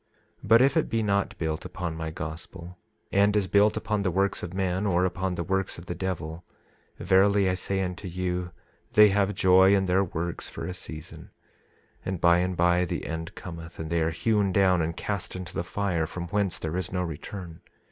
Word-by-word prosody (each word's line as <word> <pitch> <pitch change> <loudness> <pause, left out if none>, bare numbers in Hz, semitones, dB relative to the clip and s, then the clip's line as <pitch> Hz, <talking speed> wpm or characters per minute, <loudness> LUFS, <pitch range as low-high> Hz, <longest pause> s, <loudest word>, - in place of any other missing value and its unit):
27:11 - - -9
But 115 +3 +7
if 135 +3 +3
it 160 - +1
be 115 -1 0
not 100 -2 0
built 80 -1 -2
upon 90 -3 -5
my 80 0 -4
gospel, 85 +3 -8 0.3
and 100 +1 +3
is 105 -2 +2
built 100 +3 +3
upon 105 -1 -1
the 95 - +1
works 100 +3 0
of 85 - -5
men, 95 +1 -1
or 90 -1 +2
upon 90 0 -2
the 85 - -2
works 95 +1 -1
of 85 - -10
the 90 - -4
devil, 85 -2 -4 0.5
verily 100 +1 +4
I 95 - +2
say 95 +1 -1
unto 90 +1 -4
you 90 0 -2 0.4
they 105 0 +8
have 100 0 +1
joy 95 +1 +6
in 95 -1 +2
their 95 +2 +3
works 85 -1 -4
for - - -6
a 90 - -4
season, 80 -4 -8 0.7
and 95 -2 -3
by 85 +1 +5
and 90 0 -1
by 90 +1 +3
the - - -4
end 80 0 -5
cometh, 85 -1 -9
and 80 0 -6
they 85 -1 +2
are 80 - +2
hewn 100 +4 +1
down 95 -2 +3
and 80 +2 -2
cast 100 -3 -3
into 90 -1 -7
the - - -2
fire, 85 -3 -1
from 85 +1 -6
whence 100 -1 0
there 80 +2 -3
is 95 -2 -3
no 90 -1 -1
return. 85 +1 -7
90 Hz, 210 wpm, -27 LUFS, 85-100 Hz, 0.7 s, they